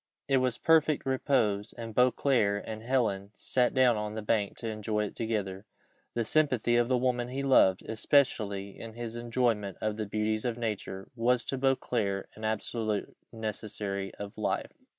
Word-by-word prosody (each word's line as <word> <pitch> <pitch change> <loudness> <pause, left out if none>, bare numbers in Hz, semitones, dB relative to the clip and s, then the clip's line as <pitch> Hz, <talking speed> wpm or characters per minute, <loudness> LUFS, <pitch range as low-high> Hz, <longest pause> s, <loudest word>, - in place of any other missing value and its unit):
It 135 -1 +3
was 130 -2 +1
perfect 155 -3 +3
repose, 125 -6 +1
and 115 -1 -6
Beauclerc 125 -4 +3
and 110 -1 -6
Helen 110 -6 0
sat 125 0 +1
down 125 -3 +5
on 105 0 -3
the 110 - -4
bank 105 -2 0
to 115 - -5
enjoy 105 -1 -1
it 100 - -8
together. 105 -3 -3 0.5
The 115 -1 0
sympathy 125 -4 +2
of 120 0 +3
the 130 - +3
woman 125 -1 0
he 135 +2 -3
loved, 95 -9 +5
especially 110 -5 +1
in 115 -1 -8
his 120 -1 -5
enjoyment 115 -5 0
of 110 -1 -2
the 110 -2 -3
beauties 110 +1 -1
of 120 -2 -1
nature, 105 -4 -4
was 120 +1 +2
to 135 - -2
Beauclerc 120 -7 0
an 110 - -12
absolute 110 -1 -2 0.2
necessary 105 -3 -4
of 100 0 -8
life. - - -1
115 Hz, 165 wpm, -30 LUFS, 105-125 Hz, 0.5 s, down